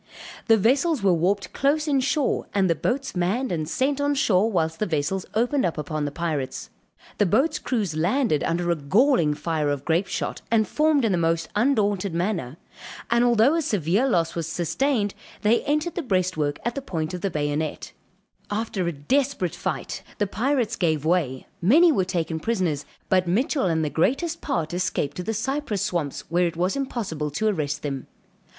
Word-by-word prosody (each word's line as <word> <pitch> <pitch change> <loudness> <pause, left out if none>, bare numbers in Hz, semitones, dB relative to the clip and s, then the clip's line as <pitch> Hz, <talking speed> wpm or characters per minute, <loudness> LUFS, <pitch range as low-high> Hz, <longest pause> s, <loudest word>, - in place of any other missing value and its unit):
The 225 -2 +6
vessels 270 - +2
were 190 -2 +4
warped 180 +3 0
close 300 +3 +1
in 280 -2 +3
shore; 275 +2 0
and 195 -2 +3
the 170 - +3
boats 265 +8 -2
manned 200 +9 0
and 155 -3 -2
sent 275 +7 0
on 285 0 +1
shore 220 -4 +2
whilst 160 -4 0
the 215 - 0
vessels 165 +4 -1
opened 245 +5 +2
upon 155 -2 -2
the 145 - -3
pirates; 150 -5 -3 0.5
the 205 - +4
boat's 295 - +2
crews 210 -10 -2
landed 175 - +1
under 175 +1 0
a - - +2
galling 165 - +3
fire 155 -2 -1
of 145 -1 -2
grape 170 +4 +1
shot - - -3
and 220 -2 +3
formed 300 -4 +2
in 220 - +2
the 180 - +1
most 165 0 0
undaunted 205 -6 +1
manner; 170 - -2 0.5
and 235 +1 +4
although 240 +3 +4
a 330 - +1
severe 205 - +1
loss 170 -7 +1
was 165 -2 -3
sustained 205 - 0 0.3
they 220 +3 +4
entered 305 +4 0
the 350 - -2
breastwork 185 - 0
at 240 - 0
the 275 - -4
point 165 -9 -3
of 180 - -5
the 195 - 0
bayonet; 150 -1 -2 0.6
after 205 -4 -2
a - - +1
desperate 190 - 0
fight - - -4 0.2
the 205 - +1
pirates 235 +2 0
gave 155 -6 0
way, 155 -7 0 0.2
many 315 - +6
were 195 -10 +2
taken 165 -3 -2
prisoners 170 -8 -1 0.2
but 185 -1 +2
Mitchell 250 - +1
and 160 -2 +1
the - - -1
greatest 275 - 0
part 170 - -2
escaped 175 -5 -1
to - - -2
the 190 - -2
cypress 230 -3 -2
swamps 165 -8 -2
where 175 +1 +1
it 165 - -6
was 180 +2 0
impossible 215 - -3
to 215 +10 -1
arrest 150 -8 -1
them. 140 -3 -4
185 Hz, 185 wpm, -24 LUFS, 160-245 Hz, 0.6 s, The